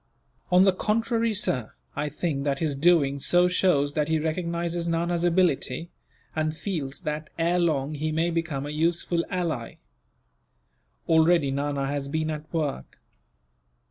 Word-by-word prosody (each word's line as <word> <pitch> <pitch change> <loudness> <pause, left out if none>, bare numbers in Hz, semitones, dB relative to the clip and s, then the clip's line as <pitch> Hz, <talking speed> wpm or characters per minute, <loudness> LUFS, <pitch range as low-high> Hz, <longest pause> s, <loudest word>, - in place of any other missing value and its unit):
"On 180 +1 +6
the 195 -1 +5
contrary, 225 +3 0
sir, 130 - -1 0.2
I 150 - -2
think 150 -2 -2
that 140 -1 0
his 150 -1 -1
doing 140 -2 +3
so 175 +5 +3
shows 175 -6 +2
that 150 -1 0
he 160 0 +2
recognizes 170 +1 -2
Nana's 170 +1 0
ability; 170 -3 +1 0.4
and 155 0 -1
feels 150 -9 -3
that, 150 0 -4
ere 170 +2 +2
long, 155 -4 0
he 155 +1 -2
may 165 +2 +1
become 165 -5 -2
a 145 - -5
useful 170 +2 0
ally. 165 -11 -3 1.3
Already 160 -3 +4
Nana 140 0 -1
has 140 0 -2
been 155 +2 -1
at 155 0 -7
work. 150 - -3
160 Hz, 140 wpm, -26 LUFS, 145-175 Hz, 1.3 s, On